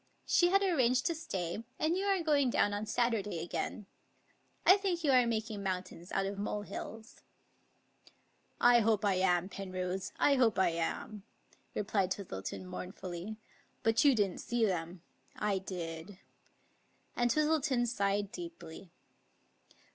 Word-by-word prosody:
" - - -41
She 350 -1 +4
had 395 +2 +4
arranged 255 -9 +2
to 335 - +2
stay, 210 - -4
and 315 +3 +1
you 385 +2 -1
are 390 -3 +2
going 290 -4 +3
down 205 -3 +2
on 205 +1 -3
Saturday 225 -7 0
again. 170 +5 -4 0.8
I 375 - +8
think 370 -4 -1
you 290 - +3
are 250 -2 +5
making 220 -2 -2
mountains 185 -2 -4
out 195 - 0
of 200 0 -4
molehills." 210 +2 -6 1.4
I 240 0 +6
hope 215 -2 +2
I 200 - +3
am, 185 -1 +2
Penrose, 185 -1 -4
I 280 -1 +4
hope 235 -4 +3
I 190 - +4
am," 170 +5 -3 0.5
replied 195 -2 0
Twistleton 180 - -5
mournfully; 185 +2 -6 0.2
" - - -36
but 225 0 +3
you 280 -3 +6
didn't 200 -5 0
see 235 -1 +1
them 175 -2 -3 0.2
— - - -35
I 195 -2 +1
did; 175 0 -6 0.5
" - - -39
and 240 0 +2
Twis 305 +5 +3
tleton 285 -6 +2
sighed 200 -3 0
deeply. 330 - -9
210 Hz, 150 wpm, -33 LUFS, 185-255 Hz, 1.4 s, I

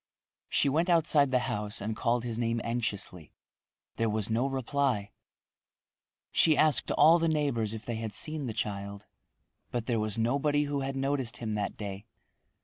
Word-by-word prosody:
She - - +2
went 160 +6 +1
outside 155 -4 +4
the 130 - +3
house 105 +1 -2
and 110 +2 -3
called 120 0 0
his 120 -2 -3
name 115 0 0
anxiously. 105 -8 -3 0.6
There 115 -1 +1
was 110 0 -2
no 120 +4 +2
reply. 130 -5 -1 1.2
She 155 -2 +4
asked 155 -2 +3
all 165 +2 +6
the 165 - +1
neighbors 135 -9 0
if 110 - -9
they 120 -2 -3
had 110 -1 -4
seen 150 +6 -1
the - - -2
child, 100 -1 -4 0.6
but 120 -2 -3
there 115 -2 0
was 110 0 -2
nobody 140 +6 +2
who 145 -1 -2
had 135 0 -3
noticed 135 -3 -1
him 110 -2 -3
that 105 -1 -2
day. 100 +1 -6
120 Hz, 165 wpm, -29 LUFS, 110-140 Hz, 1.2 s, all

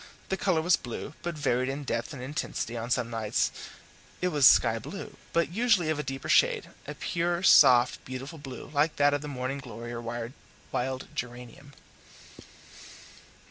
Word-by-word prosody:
The 190 - +1
colour 180 -4 +1
was 175 +1 +4
blue, 125 +4 -7
but 175 -1 -4
varied 130 -3 +1
in 140 +2 -4
depth 135 - -2
and 130 -4 -7
intensity; 130 -3 -3
on 115 +1 -4
some 120 -1 0
nights 110 -2 0 0.7
it 180 - +1
was 145 -5 +6
sky - - +5
blue, - - -8 0.2
but 170 0 +1
usually 210 -6 +2
of 155 - -2
a - - -1
deeper 135 -1 -5
shade, - - +3 0.2
a - - -6
pure, 170 +1 -1
soft, 125 -8 +6
beautiful 135 +5 -7
blue 135 -1 -9
like 150 +2 +2
that 145 0 +4
of 145 - 0
the 150 - -6
morning 135 0 -3
glory 120 -3 -8
or 120 - -5 0.7
wild 130 +1 -2
geranium. 125 +3 -7
140 Hz, 165 wpm, -28 LUFS, 125-155 Hz, 0.7 s, was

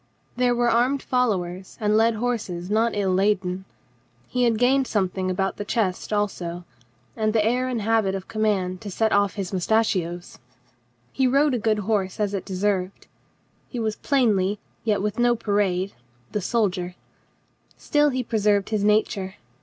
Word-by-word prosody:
There 245 0 +2
were 240 0 +2
armed 245 +4 +2
followers 190 -8 -1
and 210 -1 +2
led 225 +1 +4
horses 205 -6 -3
not 225 +1 +2
ill 195 -2 +1
laden. 190 -1 0 0.6
He 250 -1 +1
had 230 -2 +2
gained 260 +3 +3
something 190 -3 -1
about 195 +1 -1
the - - -3
chest 205 -3 -1
also, 180 -4 -2 0.5
and 215 -1 0
the 215 -2 +2
air 250 +3 +1
and 240 -4 -2
habit 215 -3 +2
of 190 -1 -6
command 195 -4 -1
to 210 - -6
set 220 +3 0
off 200 -1 +2
his 195 -2 -4
moustachios. 180 -3 0 0.7
He 265 - +2
rode 280 +2 +3
a 245 - 0
good 215 0 +1
horse 195 -3 -1
as 205 -1 0
it' 195 - -3
de 190 - -5
served. 190 -1 -1 0.6
He 250 - -6
was 220 -2 -1
plainly, 210 -8 +2 0.3
yet 210 -3 +1
with 210 +2 -2
no 240 0 +4
parade, 200 -3 0 0.4
the 210 - -1
sol 220 +2 +2
dier. 180 -1 -6 0.8
Still 295 0 +2
he 255 -2 -1
preserved 210 -3 +1
his 215 -2 0
nature. 210 -2 +1
210 Hz, 165 wpm, -24 LUFS, 190-230 Hz, 0.8 s, led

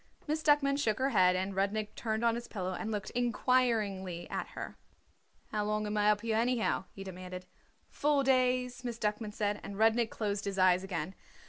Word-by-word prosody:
Miss 310 +1 -1
Duckman 290 -2 +3
shook 220 -6 +1
her 265 +1 +1
head, 185 -4 +5
and 190 +2 -1
Rudnik 205 +2 -1
turned 220 0 -2
on 230 - +4
his 235 +1 -5
pillow 185 -3 -3
and 220 - -4
looked 210 -2 -3
inquiringly 225 -7 +1
at - - -2
her. - - -5 0.8
"How 210 -1 0
long 215 0 -1
am 210 0 -2
I 210 0 +4
up 210 -1 +3
here, 225 -1 0
anyhow?" 235 -4 +1
he 195 - -8
demanded. 185 -1 -7 0.4
"Four 290 -1 +1
days," 255 -1 +2
Miss 240 -2 -4
Duckman 210 0 -2
said, 210 -1 -1
and 200 - -7
Rudnik 225 +1 +3
closed 205 -1 -2
his 200 -1 -3
eyes 185 0 +4
again. 180 -2 -3
215 Hz, 190 wpm, -32 LUFS, 195-240 Hz, 0.8 s, head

